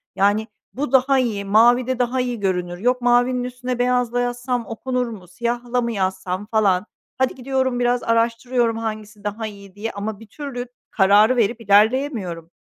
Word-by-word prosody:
Yani, 205 +3 +2 0.3
"Bu 290 +4 -3
daha 265 0 +4
iyi, 215 -6 -1
mavide 240 +4 +4
daha 250 +1 +1
iyi 245 -3 -3
görünür. 180 -2 -1
Yok, 245 +5 +1
mavinin 245 +1 +3
üstüne 250 0 -4
beyazla 245 -1 +1
yazsam 245 0 -2
okunur 250 +2 -2
mu? 200 -6 -9
Siyahla 240 +5 -2
mı 235 0 -2
yazsam?" 190 -1 -2
falan. 205 -3 +2 0.3
Hadi 260 0 +1
gidiyorum 260 -1 -1
biraz 245 0 +1
araştırıyorum, 230 +1 +1
hangisi 215 -2 -6
daha 215 +2 -3
iyi 200 -2 -12
diye 225 +2 -4
ama 205 +1 -5
bir 225 - -13
türlü 250 0 -6 0.2
kararı 210 +4 +5
verip 230 0 +1
ilerleyemiyorum. 205 - +1
235 Hz, 155 wpm, -21 LUFS, 205-250 Hz, 0.3 s, kararı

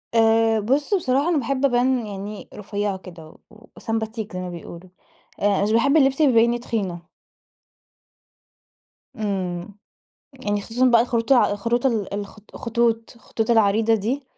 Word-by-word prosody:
آآ، 225 0 +4
بُص 275 - 0
بصراحة 285 -4 +1
أنا 340 - +2
باحب 275 +1 0
أبان 250 -1 +2
يعني 205 +1 -7
رفيعة 205 -1 -3
كده، 175 -4 -12 0.2
و 220 +1 -18
وسمباتيك 220 -2 -4
زي 180 - -4
ما 180 0 -5
بيقولوا. 175 +1 -10 0.5
آآ، 200 -1 +2
مش 210 - 0
باحب 280 +7 +3
اللبس 270 0 +3
اللي 290 -3 +5
يبيني 235 +1 +3
تخينة. 190 -8 -4 2.1
إمم، 190 -2 -4 0.6
يعني 205 -6 -3
خصوصًا 240 +5 0
بقى 235 -2 +5
الخروط 235 +1 -1
الع 250 -5 +5
الخروط 235 +5 -1
ال 220 -7 0
الخ 200 +1 -6 0.2
الخطوط- 230 -1 -1
الخطوط 225 -1 -4
العريضة 220 0 +3
دي. 235 +7 -2
225 Hz, 140 wpm, -22 LUFS, 205-245 Hz, 2.1 s, اللي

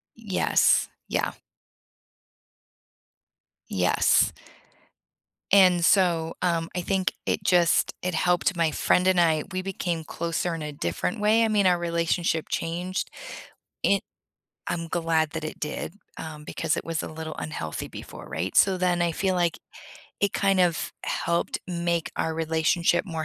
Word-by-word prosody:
Yes. 210 -5 +2 0.2
Yeah. - - 0 2.4
Yes, - - +3 1.2
and 180 -3 +6
so, 170 -4 +3
um, 165 -2 +1
I - - 0
think 190 +1 0
it - - 0
just 175 -3 +3
it 180 0 -2
helped 180 +1 +1
my 165 -2 +2
friend 180 +4 +2
and 185 -2 +4
I, 160 -3 +3
we 185 0 -2
became 175 -4 -3
closer 170 +2 -2
in 165 - -5
a 150 - -5
different 145 - -2
way, 220 +2 +4
I 225 - +2
mean, 205 -2 +2
our 180 -1 +4
relationship 170 -1 0
changed. 175 +3 -3 0.7
It 200 0 +3 0.7
I'm 170 -1 -3
glad 165 -2 +1
that 160 -1 -5
it 155 - -6
did, 150 +2 -4 0.2
um, 155 -2 -7
because 160 +1 -1
it - - -4
was 165 -2 -2
a - - -5
little 155 0 -6
unhealthy 80 - -4
before, - - -10
right? 90 +4 -3
So 190 -1 +5
then 180 -1 +1
I 170 -1 +1
feel 190 +2 0
like 175 -1 +1 0.6
it 200 - +1
kind 195 -1 +2
of 175 -3 +1
helped 170 0 -1
make 170 -2 -1
our 160 - 0
relationship 165 +2 +1
more 160 -5 -4
170 Hz, 145 wpm, -26 LUFS, 160-185 Hz, 2.4 s, and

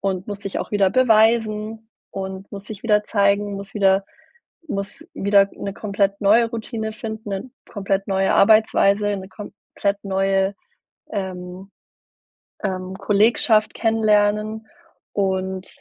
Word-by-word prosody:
und 190 -1 -2
muss 205 -1 -5
sich 195 - -4
auch - - -6
wieder 200 -3 +3
beweisen 220 -2 +2 0.2
und 190 0 -6
muss 200 0 -8
sich 210 -2 -9
wieder 210 -2 +3
zeigen, 200 -1 +1
muss 195 +1 -8
wieder 195 -1 +3 0.6
muss 200 -3 -5
wieder 200 0 +4
'ne 200 - -5
komplett 200 -1 -1
neue 225 +3 +4
Routine 220 -1 -4
finden, 220 -1 -7
'ne 195 +6 -5 0.2
komplett 195 -1 -2
neue 195 0 +1
Arbeitsweise, 205 -1 +4
'ne 190 0 -8
komplett 200 0 -4
neue, 195 0 +1 0.6
ähm, 185 -1 -6 0.9
ähm, 185 -1 -3
Kollegschaft 215 +2 +2
kennenlernen 215 -1 +1 0.5
und 190 -1 -1
200 Hz, 120 wpm, -21 LUFS, 195-215 Hz, 0.9 s, wieder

